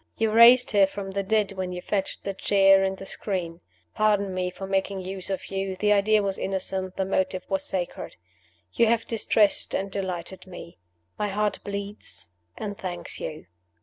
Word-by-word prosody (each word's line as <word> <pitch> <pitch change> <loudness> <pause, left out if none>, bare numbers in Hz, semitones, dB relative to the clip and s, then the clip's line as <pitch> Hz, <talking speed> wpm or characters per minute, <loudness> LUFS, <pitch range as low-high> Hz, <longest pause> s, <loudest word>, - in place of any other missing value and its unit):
You 225 -1 +1
raised 235 +3 +7
her 200 -2 +5
from 195 0 -6
the 200 +1 -1
dead 210 0 +1
when 185 -2 -4
you 180 - -4
fetched 195 -2 -2
the 195 - -3
chair 195 0 +4
and 190 0 -1
the 195 - -9
screen. 180 -4 -4 0.3
Pardon 205 -2 +2
me 185 0 -1
for 190 +2 -7
making 195 0 -1
use 190 +1 -6
of 195 0 -4
you: 195 -1 -2
the 210 +2 +3
idea 210 +1 +3
was 195 -1 -2
innocent, 190 -1 -3
the 190 - -1
motive 190 -1 -1
was 195 -1 -1
sacred. 180 -2 -4 0.6
You 230 - +4
have 230 0 +2
distressed 215 -2 +2
and 195 0 -2
delighted 185 -1 -5
me. 175 - -11 0.4
My 210 - 0
heart 210 0 0
bleeds 200 - -7 0.3
and 205 -1 -4
thanks 180 -3 -5
you." 155 - -6
195 Hz, 180 wpm, -26 LUFS, 190-205 Hz, 0.6 s, raised